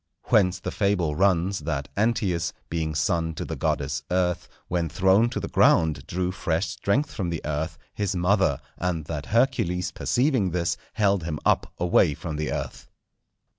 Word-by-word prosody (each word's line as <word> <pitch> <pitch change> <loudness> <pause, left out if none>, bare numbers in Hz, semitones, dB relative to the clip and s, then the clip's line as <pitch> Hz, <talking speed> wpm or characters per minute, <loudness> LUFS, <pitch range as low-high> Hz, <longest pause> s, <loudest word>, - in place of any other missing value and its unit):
Whence 95 -3 +4
the - - -4
fable 90 -7 +1
runs 95 +1 +2
that 75 -2 -3
Antæus, 100 -6 0 0.2
being 80 -2 -2
son 80 +1 0
to - - -4
the - - -4
goddess 70 -1 -1
Earth, 90 -1 0 0.2
when 85 -2 -1
thrown 95 +7 +3
to 125 - -3
the - - -4
ground 80 -4 +3
drew 90 +1 -1
fresh 85 -1 -1
strength 140 +9 0
from 95 -6 -2
the 85 -2 -2
Earth, 75 +2 -2 0.2
his 100 -2 -1
mother; 90 -4 +2 0.2
and 85 -3 -1
that 75 -3 -5
Hercules, 110 -7 +1
perceiving 125 -6 +1
this, 85 -1 0 0.2
held 100 -3 +2
him 80 -2 -3
up - - +2
away 85 -3 +3
from 80 -3 -5
the 75 0 -2
Earth. - - -5
90 Hz, 165 wpm, -25 LUFS, 80-100 Hz, 0.2 s, Whence